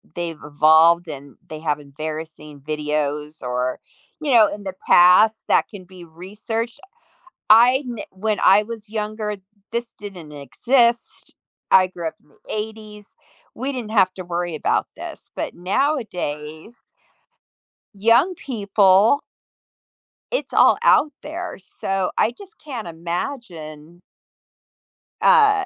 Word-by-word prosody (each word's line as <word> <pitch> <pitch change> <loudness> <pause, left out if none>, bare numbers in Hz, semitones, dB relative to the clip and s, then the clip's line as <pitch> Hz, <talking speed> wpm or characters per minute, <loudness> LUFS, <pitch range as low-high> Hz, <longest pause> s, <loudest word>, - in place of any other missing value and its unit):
they've 170 -2 -4
evolved 160 +3 +4
and 140 -2 -9
they 155 -1 -7
have 150 -2 -1
embarrassing 150 0 -8
videos 150 0 -3
or, 125 +1 -2 0.4
you 290 -3 -1
know, 220 -4 +6
in 205 0 -7
the 190 -1 -5
past 185 +5 +6
that - - +3
can 200 -4 -11
be 180 -1 -13
researched. 215 - -6 0.7
I 245 +5 +6
n 240 -2 -6
when 205 +2 -2
I 195 +2 +7
was 220 -1 -9
younger, 215 -1 -4 0.3
this 235 0 -2
didn't 180 -7 -9
exist. 235 - 0 0.4
I 185 -1 +6
grew 170 -2 -6
up - - -6
in - - -31
the - - -25
‘80s. 215 -1 -6 0.5
We 270 +2 -3
didn't 235 -5 -6
have 185 0 +3
to 185 - -8
worry 175 -1 -3
about - - 0
this, - - -8 0.2
but - - -3
nowadays 180 - -3 1.2
young 230 - +3
people 205 0 +3 1.1
it's - - -3
all - - +5
out 300 - +4
there. 340 +4 -6 0.2
So, 195 -1 -1
I 230 - +3
just 395 - -14
can't 245 - -6
imagine 170 - -6 1.2
uh, 420 -4 +5
190 Hz, 125 wpm, -21 LUFS, 160-230 Hz, 1.2 s, I